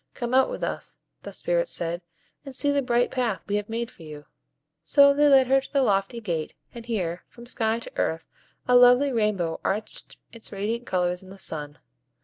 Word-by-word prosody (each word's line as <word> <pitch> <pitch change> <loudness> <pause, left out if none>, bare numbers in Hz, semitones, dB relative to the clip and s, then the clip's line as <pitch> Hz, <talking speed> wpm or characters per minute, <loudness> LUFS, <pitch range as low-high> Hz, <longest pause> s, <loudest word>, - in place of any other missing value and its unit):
Come 240 -1 -4
out 265 0 +4
with - - -5
us," - - -4 0.2
the - - -8
Spirits - - -1
said, 170 +1 -2 0.4
"and 275 -2 -9
see 285 +3 +2
the 285 0 +2
bright 245 -1 +1
path 235 -9 -1
we 205 - 0
have 210 0 -5
made 230 +1 -3
for - - -19
you." 150 -2 -10 0.6
So 280 - +5
they 295 +1 +4
led 270 -2 +6
her 270 +1 +3
to - - -13
the 275 -2 +2
lofty 195 +1 0
gate, 170 -8 -4 0.2
and 235 -1 -10
here, 180 -7 -2
from 235 - -14
sky 225 -2 0
to 235 - -8
earth, 160 0 -1 0.4
a 250 - +4
lovely 250 +3 +6
rainbow 210 -8 0
arched 210 +3 -4 0.2
its 230 -1 -9
radiant 220 +4 -3
colors 180 -1 0
in 190 - -14
the 195 - -11
sun. 150 -6 -4
230 Hz, 200 wpm, -25 LUFS, 185-255 Hz, 0.6 s, led